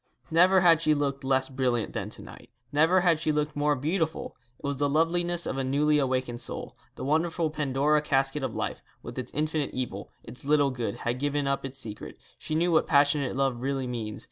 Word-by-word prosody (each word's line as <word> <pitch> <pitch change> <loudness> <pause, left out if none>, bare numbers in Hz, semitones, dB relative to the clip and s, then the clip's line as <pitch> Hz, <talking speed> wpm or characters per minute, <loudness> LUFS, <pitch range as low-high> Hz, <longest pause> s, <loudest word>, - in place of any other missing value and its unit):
Never 180 +3 +5
had 165 -3 +5
she 155 -2 +3
looked 140 -1 -2
less 130 0 +1
brilliant 125 -4 -1
than - - -3
to - - -9
night; - - -13 0.2
never 165 +5 +4
had 170 -3 +3
she 155 -1 0
looked 150 0 -1
more 145 0 +2
beautiful. 160 +4 -2 0.2
It - - -10
was 140 -1 -1
the 145 +1 +1
loveliness 170 +3 +1
of 135 - -3
a - - 0
newly 150 +3 +2
awakened 130 -3 -1
soul. - - -5 0.2
The - - -7
wonderful 160 +2 +1
Pandora 150 0 +1
casket 135 0 0
of 130 -4 -3
life, - - -3 0.2
with - - -6
its - - -6
infinite 155 -1 -1
evil, 130 -1 -4
its 125 - -10
little 145 -1 +3
good, 120 -5 -3
had 120 +1 -1
given 145 0 0
up 140 0 -1
its 135 0 -7
secret. 105 -4 -7 0.2
She 155 - -4
knew 170 +2 +2
what 160 - +3
passionate 140 -2 +3
love 135 -3 0
really 135 0 -1
means. 115 -4 -4
145 Hz, 205 wpm, -27 LUFS, 130-155 Hz, 0.2 s, Never